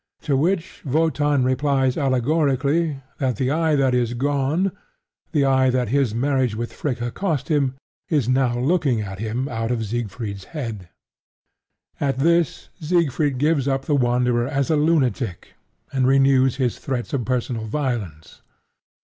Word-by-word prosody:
To 145 - +1
which 175 +5 -1
Wotan 145 -2 +1
replies 130 0 +1
allegorically 140 +2 +1 0.2
that 130 -3 0
the 130 +5 0
eye 160 0 +2
that 135 -2 +2
is 120 -1 0
gone 145 +8 0 0.6
the 145 -4 +2
eye 130 -1 +3
that 125 -3 0
his 130 -4 +1
marriage 130 -2 +1
with 115 +1 -4
Fricka 120 -4 -3
cost 165 -8 -2
him 140 -4 +1 0.3
is 145 -8 +1
now 130 -1 +2
looking 135 -3 +1
at 95 -2 -6
him 115 +5 -2
out 115 -3 -3
of 115 -2 -1
Siegfried's 105 -3 -4
head. 110 - -5 1.1
At 135 -2 0
this, 170 +3 +1
Siegfried 155 -4 +1
gives 145 0 +1
up 135 0 0
the 150 - 0
Wanderer 125 -2 +1
as 140 +2 -1
a - - +4
lunatic, 140 - 0 0.4
and 130 -2 +2
renews 135 -1 +4
his 130 -3 -1
threats 130 -1 -4
of 135 -4 0
personal 120 -2 -2
violence. 110 - -4
130 Hz, 145 wpm, -22 LUFS, 120-145 Hz, 1.1 s, a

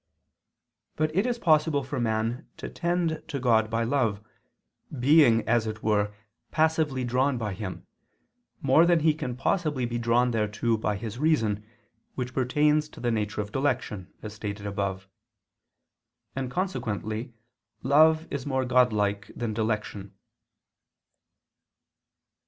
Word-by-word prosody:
But 155 0 -1
it 195 +6 +2
is 245 -1 -1
possible 155 - +2
for 135 +1 -4
man 115 +1 -1
to - - -6
tend 170 -2 -1
to 145 -3 -4
God 115 -3 +3
by 115 +1 0
love, 115 -5 0 0.8
being 130 -4 +5
as 115 -1 +2
it 110 0 -6
were 105 -1 +1 0.4
passively 155 -4 +1
drawn 130 +2 +1
by 105 -4 -3
Him, 95 -1 -6 0.8
more 150 +5 +5
than 170 -2 +4
he 155 0 +4
can 130 -6 -5
possibly 150 -2 0
be 120 0 -3
drawn 120 +1 +2
thereto 110 +1 0
by 105 -1 -1
his 110 +3 -6
reason, 115 -10 +1 0.5
which 125 -1 -4
pertains 150 +4 +2
to - - -13
the 120 -1 0
nature 105 -1 -1
of 105 0 -7
dilection, 125 -8 -2
as 105 -1 -6
stated 105 -1 -6
above. 100 -1 -3 1.3
And 130 -1 -3
consequently 115 - -3 0.5
love 155 +4 +5
is 140 -1 -4
more 130 -2 0
Godlike 105 -5 +2
than 115 -3 -3
dilection. 105 -2 -3
120 Hz, 130 wpm, -27 LUFS, 110-150 Hz, 1.3 s, being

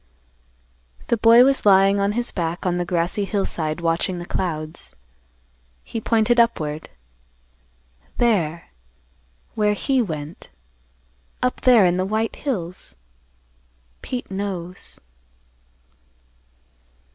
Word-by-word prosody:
The 235 - +2
boy 230 +2 +7
was 275 0 +2
lying 195 0 +5
on 200 +1 +1
his 240 +2 -2
back 170 0 -3
on 180 -1 0
the 175 - -1
grassy 175 +3 -1
hillside 170 -5 -2
watching 170 +2 0
the 175 - -6
clouds. 155 - -4 0.9
He 225 - -6
pointed 230 +2 +2
upward, 155 -10 0 1.3
"There, 170 -9 0 0.8
where 210 -1 +1
he 265 +4 +1
went; 155 -6 -6 0.9
up 250 - -1
there 240 -6 +6
in 175 0 +2
the 185 - 0
white 220 +3 -2
hills. 185 - -5 1.1
Pete 250 -5 -6
knows." 190 -2 -6
195 Hz, 100 wpm, -22 LUFS, 170-225 Hz, 1.3 s, boy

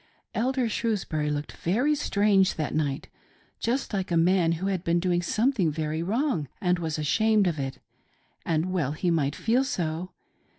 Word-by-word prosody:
Elder 255 +1 0
Shrewsbury 195 -9 -1
looked 145 0 -3
very 245 - +1
Strange 205 -9 +2
that 155 -2 -2
night, 145 -3 -1 0.5
just 245 +1 -1
like 190 -2 -1
a 170 - +2
man 170 0 +3
who 170 +3 -3
had 190 -3 -1
been 170 +1 +2
doing 175 0 +1
something 215 - +1 0.3
wrong 210 - 0
and 180 -3 +1
was 160 -2 -2
ashamed 215 +7 +2
of 165 -4 0
it 135 -1 -3 0.3
— - - -39
:and 165 +3 0
well 150 -6 0
he 175 +3 0
might 145 -3 +1
feel 240 +4 +2
so. 175 - -2
180 Hz, 165 wpm, -27 LUFS, 160-220 Hz, 0.5 s, man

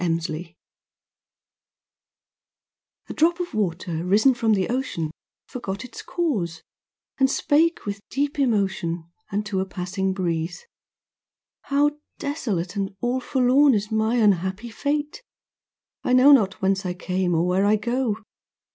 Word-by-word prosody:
NIRVANA 165 0 -2 2.5
A - - -4
drop 340 +3 +2
of 355 0 -4
water 170 -5 -2
risen 210 +9 +4
from 225 -2 +1
the 190 -2 0
ocean 235 -11 -2 0.4
Forgot 205 -4 -5
its 245 - -9
cause, 195 - -2 0.6
and 265 0 +4
spake 320 +5 +2
with 200 -1 -3
deep 285 +2 -1
emotion 190 -9 0 0.2
Unto 205 -1 -1
a 190 - 0
passing 190 +1 -2
breeze. 175 - -2 1.0
'How 290 +1 +2 0.2
desolate 210 - -3
And 195 -1 -3
all 245 +2 0
forlorn 260 +1 +4
is 210 +1 -2
my 220 +2 +1
unhappy 205 0 +1
fate. 295 - -2 0.8
I 250 - +1
know 255 +3 +7
not 200 -9 +4
whence 195 +1 +2
I 180 -1 -3
came, 180 -1 -1
or 165 +2 +2
where 185 +3 +2
I 210 - +5
go. 230 0 -1
205 Hz, 130 wpm, -24 LUFS, 185-260 Hz, 2.5 s, know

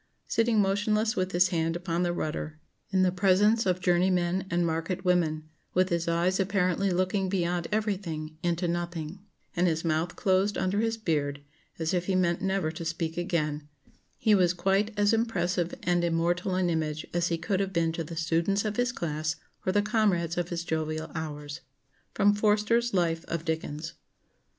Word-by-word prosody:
Sitting 230 -1 +2
motionless 210 +3 +1
with 185 -2 -1
his 180 +1 +4
hand 165 -1 0
upon 175 -1 -2
the 175 -1 +1
rudder, 155 -2 -4 0.3
in 190 -1 +2
the 185 - +3
presence 200 +4 +3
of 180 0 +1
journey 180 0 +3
men 180 +1 0
and 175 0 +1
market 165 +3 -2
women, 160 -4 +1 0.3
with 185 +1 +3
his 170 -1 -1
eyes 175 +3 +1
apparently 195 0 +1
looking 185 +1 0
beyond 175 -2 0
everything 185 -8 -2
into 175 0 0
nothing, 170 0 -3 0.4
and 180 +1 +3
his 165 0 -1
mouth 165 +2 0
closed 195 +2 +1
under 190 +2 0
his 225 0 0
beard, 145 -8 -1 0.3
as 160 +1 -1
if 180 -1 0
he 190 - +1
meant 175 -2 +1
never 190 -4 0
to 165 +1 -7
speak 165 0 -3
again, 155 -4 -2 0.5
he 215 - +3
was 185 -3 +4
quite 195 +4 +1
as 205 +1 +3
impressive 180 -6 0
and 175 -1 +2
immortal 175 +2 0
an 185 -1 +1
image 155 -1 -2
as 175 0 +1
he 170 - 0
could 190 +3 -1
have 195 -1 -1
been 170 -2 +1
to 165 0 -3
the 165 +2 -8
students 170 +5 +1
of 215 +1 -2
his 245 0 +2
class 155 -6 -2 0.3
or - - +4
the 205 +1 +2
comrades 195 -7 +1
of 175 -1 -2
his 170 -1 -3
jovial 155 -1 -3
hours." 150 -1 -5 0.6
[Sidenote: 205 0 +4
Forster's 220 +3 +2
Life 165 -2 +1
of 170 -1 -3
Dickens. 160 0 -3
175 Hz, 180 wpm, -28 LUFS, 165-195 Hz, 0.6 s, his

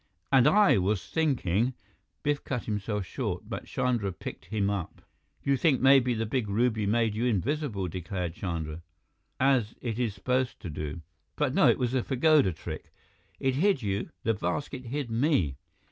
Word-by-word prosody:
"And 130 -2 +6
I 205 - +5
was 95 +1 0
thinking 125 - +1 0.2
" - - -47
Biff 145 -1 0
cut 125 -3 -3
himself 105 -1 -2
short, - - -4
but - - -5
Chandra 120 -6 0
picked 90 - -8
him 100 +2 -1
up. 100 -5 -3 0.4
"You 140 - +3
think 140 -2 +3
maybe 130 -2 +5
the 115 0 -1
big 110 -1 -1
ruby 110 0 +1
made 115 0 +2
you 115 +3 -1
invisible," 120 - 0
declared 90 0 -4
Chandra, 85 -3 -4 0.6
"as 130 -5 +2
it 115 -2 -3
is 115 -5 0
supposed 125 +4 -1
to 85 - -5
do. 75 +2 -5 0.3
But 145 -3 0
no, - - +5
it - - +4
was 125 -3 0
the 130 -1 +1
pagoda 140 -4 +3
trick. 80 -1 -8 0.5
It 135 -1 +1
hid 180 - +2
you, 100 0 -2
the 115 - +2
basket 125 +7 -3
hid 130 0 -3
me." 115 - +1
115 Hz, 170 wpm, -28 LUFS, 100-130 Hz, 0.6 s, And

